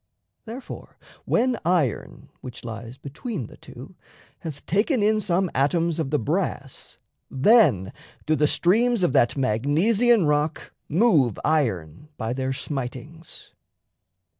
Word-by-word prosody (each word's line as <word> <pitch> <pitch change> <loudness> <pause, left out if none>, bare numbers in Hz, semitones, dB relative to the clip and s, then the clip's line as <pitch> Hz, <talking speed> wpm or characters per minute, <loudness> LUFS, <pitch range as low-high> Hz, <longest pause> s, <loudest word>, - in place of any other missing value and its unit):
Therefore, 240 +4 -9 0.3
when 245 +1 +1
iron 165 -8 -1
(which 125 -2 -9
lies 115 +2 -8
between 150 - -6
the - - -13
two) - - -12 0.5
Hath 155 -3 -8
taken 210 - +1
in 215 +1 +2
some 185 -2 0
atoms 165 +4 +1
of 155 -4 -1
the 150 - +1
brass, 145 - -3 0.3
Then 135 - +3 0.3
do 155 - +2
the 150 -1 +2
streams 225 +7 +2
of 155 - +2
that 120 - +3
Magnesian 165 - +2
rock 150 +1 -1 0.2
Move 155 - +3
iron 115 - -1
by 115 0 -3
their 130 0 -2
smitings. 140 +4 -6
155 Hz, 120 wpm, -24 LUFS, 130-195 Hz, 0.5 s, Then